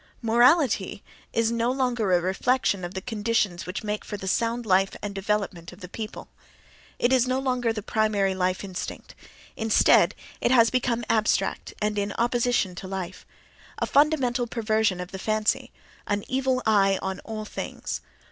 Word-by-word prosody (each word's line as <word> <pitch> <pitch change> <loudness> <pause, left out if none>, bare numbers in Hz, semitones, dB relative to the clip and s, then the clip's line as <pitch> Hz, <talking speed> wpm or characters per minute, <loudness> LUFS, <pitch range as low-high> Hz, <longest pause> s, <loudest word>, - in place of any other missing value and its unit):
Morality 235 - +3 0.3
is 230 0 +1
no 235 +1 +1
longer 245 -6 0
a 180 - +5
reflection 195 +2 +1
of 175 +2 -6
the 190 - -3
conditions 210 -6 -1
which 185 +4 -4
make 210 0 -3
for 205 - -6
the 190 - -7
sound 230 +4 0
life 195 -1 +2
and 205 -1 -3
development 195 -3 -2
of 180 - -14
the 180 - -8
people; 215 +4 -7 0.7
it 245 +2 +2
is 255 -1 +4
no 255 +1 +1
longer 250 -3 0
the 215 -2 -5
primary 210 -3 +1
life 185 0 -1
instinct; 190 -2 -6 0.4
instead 220 -1 +4 0.3
it - - +2
has 235 -2 +5
become 240 -2 0
abstract 220 -1 0
and 210 0 0
in 200 0 -2
opposition 240 -5 +1
to 185 +1 -8
life—a 190 -2 -7
fundamental 270 -5 +2
perversion 220 -4 0
of 180 +1 -6
the 190 - -6
fancy, 215 +2 0 0.4
an 205 0 -1
"evil 260 -1 0
eye" 195 -3 +4
on 190 0 -3
all 215 -1 -6
things. - - -5
215 Hz, 160 wpm, -26 LUFS, 195-240 Hz, 0.7 s, a